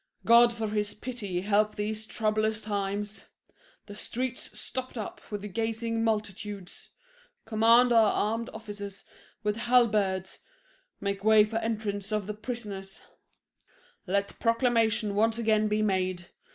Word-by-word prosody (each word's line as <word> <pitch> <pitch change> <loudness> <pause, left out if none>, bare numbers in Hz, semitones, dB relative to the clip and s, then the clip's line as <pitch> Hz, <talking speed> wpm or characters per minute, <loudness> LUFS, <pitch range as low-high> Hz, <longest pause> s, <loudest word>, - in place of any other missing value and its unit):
God 235 +1 +7
for 225 -2 -3
his 210 -1 -2
pity 210 -6 -4
help 210 +2 +2
these 215 +1 -3
troublous 215 0 0
times! 205 0 -3 0.6
The 205 - -10
streets 245 +4 -4
stopped 255 -1 -4
up 215 - -6
with 205 -2 -5
gazing 225 +1 -1
multitudes: 210 -3 -3 0.6
Command 230 +2 +5
our 225 -2 +6
armed 225 +2 -1
officers 205 -3 -8 0.4
with 210 0 0
halberds 210 -6 +2 0.6
Make 200 0 -3
way 220 0 +7
for 215 +2 -2
entrance 215 -3 -2
of 210 -2 0
the 210 - -4
prisoners; 210 -4 -6 1.1
Let 200 +2 -1
proclamation 230 -2 +2
once 220 +2 +2
again 215 -2 +2
be 215 0 +1
made. 185 -3 -1
215 Hz, 125 wpm, -28 LUFS, 205-225 Hz, 1.1 s, God